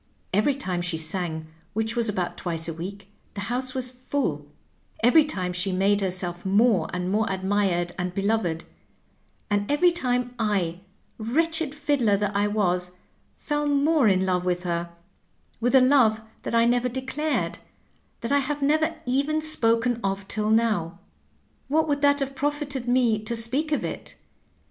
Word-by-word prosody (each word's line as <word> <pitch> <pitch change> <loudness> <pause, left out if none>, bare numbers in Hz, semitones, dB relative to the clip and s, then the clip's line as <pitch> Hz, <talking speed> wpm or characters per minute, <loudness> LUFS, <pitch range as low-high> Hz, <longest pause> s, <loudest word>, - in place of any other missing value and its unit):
Every 215 +8 +3
time 185 -10 -2
she 175 -2 -1
sang, 160 0 +1 0.3
which 220 +2 -1
was 235 -2 +1
about 185 -4 -2
twice 165 -2 -2
a 165 - -3
week, 195 +4 -8 0.3
the 200 - -4
house 250 +5 -3
was 255 -1 -2
full; 250 - -3 0.6
every 280 +7 +7
time 185 -12 -3
she 180 +2 -1
made 200 +2 +2
herself 180 -2 -2
more 200 -3 +3
and 180 +1 -2
more 215 +1 +1
admired 190 -2 0
and 180 0 -1
beloved; 195 -4 -1 0.9
and 205 0 0
every 345 +5 +4
time 250 -7 -1
I, 190 -6 0 0.4
wretched 315 +6 0
fiddler 285 -9 +2
that 205 0 -2
I 205 +1 +2
was, 180 -4 0 0.4
fell 295 0 -2
more 290 -1 +3
in 190 -2 +3
love 180 -1 0
with 180 0 -1
her, 170 -1 -2 0.7
with 245 +3 +2
a - - +9
love 255 -5 +4 0.2
that - - -3
I 230 0 +5
never 245 +1 +2
de 260 +2 -4
clared, 300 +4 -2 0.6
that 230 - -3
I 285 - +4
have 285 +1 -2
never 315 +3 +2
even 280 +5 +1
spoken 240 -6 +1
of 195 0 -2
till 215 0 -1
now. 215 -7 +1 0.7
What 315 +3 +2
would 285 -1 0
that 285 0 +4
have 275 0 -2
profited 290 -2 -2
me 245 -3 +3
to 220 +2 -3
speak 260 +7 -1
of 295 - 0
it? - - -6
225 Hz, 165 wpm, -25 LUFS, 185-275 Hz, 0.9 s, a